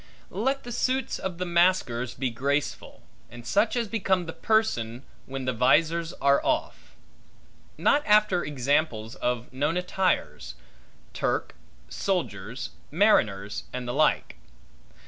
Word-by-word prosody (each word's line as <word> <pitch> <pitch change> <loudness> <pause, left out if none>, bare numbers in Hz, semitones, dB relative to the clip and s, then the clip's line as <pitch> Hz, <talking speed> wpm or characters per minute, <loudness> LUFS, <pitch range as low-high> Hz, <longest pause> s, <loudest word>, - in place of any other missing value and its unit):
Let 265 +7 -1
the 240 - -7
suits 255 +3 -1
of 185 -2 -4
the 180 - -2
masquers 170 -9 +1
be 130 -2 -2
graceful, 140 +5 -2 0.3
and 120 0 -11
such 205 - +2
as 235 -2 0
become 190 -4 0
the 165 - -6
person, 130 - 0 0.2
when 135 -1 -5
the 130 - 0
vizors 165 +7 +2
are 140 0 +3
off; 315 0 -2 0.8
not 290 - +3
after 210 -4 +4
examples 140 -5 0
of 125 0 -3
known 145 +6 0
attires; 180 - -1 0.6
Turke, - - -1 0.3
soldiers, 125 - -3 0.2
mariners', 105 - +2
and 125 -1 -5
the 120 - -2
like. 150 +2 +1
155 Hz, 125 wpm, -26 LUFS, 125-190 Hz, 0.8 s, after